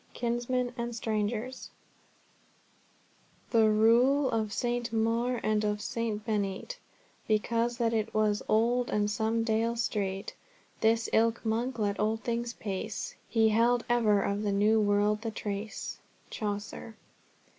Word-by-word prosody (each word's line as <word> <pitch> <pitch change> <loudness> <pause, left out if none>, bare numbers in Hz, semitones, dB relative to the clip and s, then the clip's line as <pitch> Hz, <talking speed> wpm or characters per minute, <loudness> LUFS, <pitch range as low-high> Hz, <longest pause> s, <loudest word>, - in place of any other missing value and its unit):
KINSMEN 240 +1 -1
AND 235 0 -3
STRANGERS 220 +3 -2 1.8
"The 225 -2 +5
reul 240 +6 +4
of 220 -2 -1
St. 240 +1 -1
Maure 230 +2 +1
and 215 0 +1
of 210 0 0
St. 215 -1 -3
Beneit 210 - -2 0.5
Because 230 +2 +1
that 230 -2 +1
it 220 -1 0
was 215 -1 +1
old 240 +3 +2
and 210 0 +1
some 225 +1 0
deale 225 +1 +1
streit 200 -4 -2 0.5
This 225 +1 +2
ilke 230 +1 +2
monk 235 +3 -1
let 205 -2 -1
old 220 +1 0
things 235 0 -2
pace; 210 0 -4 0.2
He 225 -1 +3
held 235 +2 +3
ever 215 -4 +3
of 200 +1 -1
the 205 -1 0
new 210 +2 +3
world 205 +1 +2
the 225 - -3
trace." 210 0 -5 0.3
Chaucer. 210 +1 -5
225 Hz, 130 wpm, -29 LUFS, 210-235 Hz, 1.8 s, The